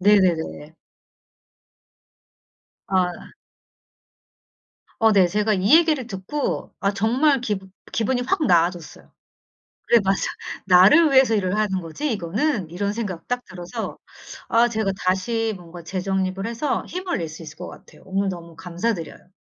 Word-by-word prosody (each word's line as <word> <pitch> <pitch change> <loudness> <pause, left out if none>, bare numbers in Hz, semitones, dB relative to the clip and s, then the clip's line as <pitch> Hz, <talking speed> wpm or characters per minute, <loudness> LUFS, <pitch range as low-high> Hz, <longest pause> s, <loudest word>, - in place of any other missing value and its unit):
네네네. 175 -5 +2 2.1
아. 180 -2 -1 1.7
어 225 -1 +5
네 190 -3 +5
제가 210 +2 +1
이 195 +11 +5
얘기를 310 -7 +2
듣고 195 +10 -4
아 200 +1 +1
정말 255 +7 +2
기분 195 -5 -4 0.2
기분이 245 +3 0
확 345 +3 0
나아졌어요. 170 -1 0 0.7
'그래 235 - +5
맞아. 195 0 +1 0.4
나를 195 - +6
위해서 260 -4 +5
일을 190 -1 0
하는 195 -3 0
거지 185 - -4
이거는.' 200 - -1
이런 200 +3 -2
생각 200 -7 -5
딱 245 0 -2
들어서 175 -1 -6 0.5
아 235 +1 +4
제가 220 -4 -1
다시 220 +4 0
뭔가 175 -1 -11
재정립을 190 +2 -2
해서 235 +5 -2
힘을 365 - -3
낼 165 -2 -4
수 160 +2 -10
있을 155 -1 -10
것 180 - -7
같아요. - - -14
오늘 195 +1 -1
너무 170 -2 -8
감사드려요. 180 -1 -4
195 Hz, 265 characters per minute, -23 LUFS, 180-230 Hz, 2.1 s, 나를